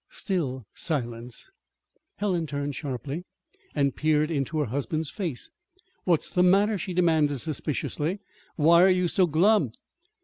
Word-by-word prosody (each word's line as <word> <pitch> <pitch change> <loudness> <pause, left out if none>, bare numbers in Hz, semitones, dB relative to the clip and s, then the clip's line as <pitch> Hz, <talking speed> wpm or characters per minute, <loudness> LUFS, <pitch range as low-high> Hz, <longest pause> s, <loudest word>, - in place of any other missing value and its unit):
Still 165 - -2
silence. 120 -6 -4 0.6
Helen 180 -5 -1
turned 145 0 -3
sharply 140 +3 -5 0.5
and 140 -3 +1
peered 155 +1 +1
into 145 +1 -1
her 150 - +1
husband's 145 +5 -2
face. 170 - -4 0.5
"What's 170 -4 +1
the 180 - +3
matter?" 200 +3 +4
she 180 0 -4
demanded 160 -5 +3
suspiciously. 155 - -3 0.4
"Why 170 +2 +5
are 190 - +7
you 180 -1 +2
so 180 +1 +3
glum?" 165 - +3
155 Hz, 130 wpm, -26 LUFS, 140-180 Hz, 0.6 s, are